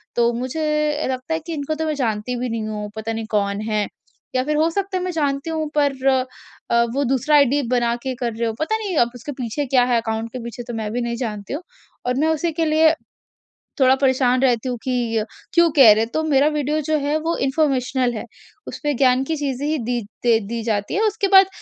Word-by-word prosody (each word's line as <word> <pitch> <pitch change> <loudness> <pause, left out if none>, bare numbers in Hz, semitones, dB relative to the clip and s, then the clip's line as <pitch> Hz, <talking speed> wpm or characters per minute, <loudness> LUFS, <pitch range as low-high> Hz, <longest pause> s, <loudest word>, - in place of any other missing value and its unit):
तो 235 0 +3
मुझे 300 +4 -1
लगता 255 +5 -3
है 320 - 0
कि 335 - -3
इनको 300 +1 -3
तो 320 +1 -2
मैं 310 - 0
जानती 230 -2 -2
भी 250 -1 -2
नहीं 225 -1 -3
हूँ 210 -1 -4
पता 220 +1 -3
नहीं 225 0 -4
कौन 200 0 0
है? 210 -1 0 0.5
या 255 - +2
फ़िर 300 +2 -1
हो 320 +2 +3
सकता 390 +2 -2
है 365 - -2
मैं 365 - -2
जानती 285 -1 -1
हूँ 315 -1 -2
पर 275 -2 +1 0.6
अ, 235 0 +4
वो 280 - +1
दूसरा 270 +4 +2
आई 285 -1 +7
डी 290 - +2
बना 240 -1 +1
के 260 -1 -3
कर 235 -2 -3
रहे 230 +1 -1
हों, 225 - -3
पता 435 +8 0
नहीं 400 -6 -3
अब 235 -2 +3
उसके 245 +5 -7
पीछे 250 +5 -2
क्या 255 -1 +3
है, 245 -1 +2
अकाउंट 225 0 -3
के 255 - -4
पीछे 235 +1 -7
तो 240 0 -7
मैं 215 -2 -3
भी 245 - -1
नहीं 235 0 -2
जानती 210 -1 -4
हूँ 315 - -4 0.4
और 250 0 0
मैं 315 - +2
उसी 320 +1 0
के 325 +1 0
लिए 315 +1 +4 0.8
थोड़ा 260 0 +5
परेशान 260 -2 +2
रहती 250 -2 +2
हूँ 245 - -2
कि 245 -3 -1
अ, 215 - +1 0.3
क्यों 340 -1 +5
कह 265 -7 +8
रहे 220 - +1
हैं? 225 - -3
तो 315 - 0
मेरा 290 -2 +3
वीडियो 300 +1 0
जो 310 +1 0
है 290 +2 0
वो 330 +2 -1
इन्फॉर्मेशनल 265 -3 +1
है, 220 - -5 0.4
उसमें 295 -2 -2
ज्ञान 255 0 +3
की 320 +4 -2
चीज़ें 280 -1 -2
ही 310 0 0
दी 240 0 -1 0.2
दे 230 -2 +4
दी 230 +1 -3
जाती 210 -3 -1
हैं। 425 - +1
उसके 420 -2 +1
बाद 385 -1 +7
260 Hz, 240 wpm, -21 LUFS, 235-305 Hz, 0.8 s, कह